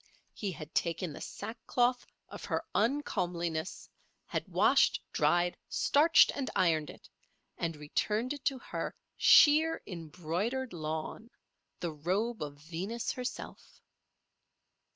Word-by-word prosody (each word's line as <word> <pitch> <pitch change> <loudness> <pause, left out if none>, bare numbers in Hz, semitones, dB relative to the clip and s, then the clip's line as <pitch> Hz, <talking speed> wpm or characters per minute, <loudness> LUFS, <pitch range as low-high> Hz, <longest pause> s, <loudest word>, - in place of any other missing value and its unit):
He 200 -3 -3
had 155 -1 -9
taken 170 -1 -1
the - - -9
sackcloth 240 +3 -1 0.2
of - - -10
her - - -2
uncomeliness, 180 - -1 0.4
had - - -3
washed, - - +4
dried, 175 0 +2
starched 315 +3 +5
and 275 -2 -3
ironed 160 -4 +2
it, - - -12 0.5
and 165 -1 -2
returned 210 - -1
it 285 -2 -9
to 270 - +1
her 250 - -5 0.2
sheer 315 +2 +6
embroidered 180 - -3
lawn—the 160 +3 -6
robe 195 +10 -1
of 145 -1 -4
Venus 180 +10 -4
herself. 250 -1 -7
185 Hz, 110 wpm, -31 LUFS, 165-245 Hz, 0.5 s, sheer